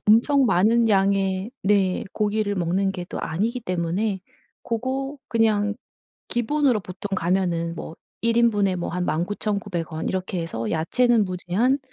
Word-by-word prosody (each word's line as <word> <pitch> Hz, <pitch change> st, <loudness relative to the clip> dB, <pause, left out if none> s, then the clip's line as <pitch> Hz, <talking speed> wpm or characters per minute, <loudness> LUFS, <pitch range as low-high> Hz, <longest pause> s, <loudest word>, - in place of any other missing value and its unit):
엄청 255 Hz, +6 st, +5 dB
많은 225 Hz, +4 st, +4 dB
양의 195 Hz, 0 st, +2 dB
네 195 Hz, -2 st, +2 dB
고기를 210 Hz, -1 st, 0 dB
먹는 185 Hz, +2 st, +1 dB
게 180 Hz, -2 st, -5 dB
또 -, -, -5 dB
아니기 220 Hz, +10 st, -1 dB
때문에 185 Hz, +1 st, -1 dB, 0.4 s
고거 265 Hz, +4 st, -3 dB
그냥 210 Hz, -2 st, +2 dB, 0.5 s
기본으로 250 Hz, 0 st, +1 dB
보통 190 Hz, +1 st, -7 dB
가면은 170 Hz, -2 st, 0 dB
뭐 160 Hz, -, -7 dB, 0.3 s
1 230 Hz, 0 st, +2 dB
인분에 205 Hz, -5 st, +3 dB
뭐 175 Hz, -, -3 dB
한 180 Hz, +1 st, -2 dB
19,900 190 Hz, 0 st, -2 dB
원 160 Hz, -, -3 dB
이렇게 185 Hz, -1 st, -2 dB
해서 115 Hz, -9 st, -4 dB
야채는 225 Hz, +7 st, +2 dB
무제한 185 Hz, +9 st, 0 dB
200 Hz, 255 characters per minute, -24 LUFS, 180-230 Hz, 0.5 s, 엄청